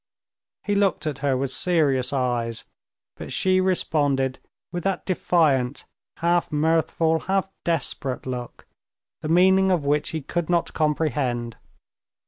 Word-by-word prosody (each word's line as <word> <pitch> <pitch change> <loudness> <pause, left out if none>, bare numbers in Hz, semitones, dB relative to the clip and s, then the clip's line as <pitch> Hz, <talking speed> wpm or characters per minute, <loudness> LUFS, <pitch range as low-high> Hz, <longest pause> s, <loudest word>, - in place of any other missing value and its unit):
He 205 - -1
looked 200 -4 +1
at 150 -3 -3
her 135 -2 +1
with 135 0 -2
serious 140 -7 +1
eyes, 120 -4 -1 0.5
but - - -8
she 185 0 +2
responded 145 -8 0 0.3
with 175 -1 -4
that 195 -1 -1
defiant, 150 -8 +1 0.3
half 170 +1 +1
mirthful, 160 +1 +1
half 195 +2 0 0.2
desperate 150 -6 -2
look, 125 -2 -6 0.6
the 155 - -4
meaning 190 +3 +5
of 175 -6 +1
which 145 +1 +1
he 160 -3 -4
could 175 +3 -3
not 170 -1 +1
comprehend. 140 -7 -1
155 Hz, 125 wpm, -24 LUFS, 135-175 Hz, 0.6 s, meaning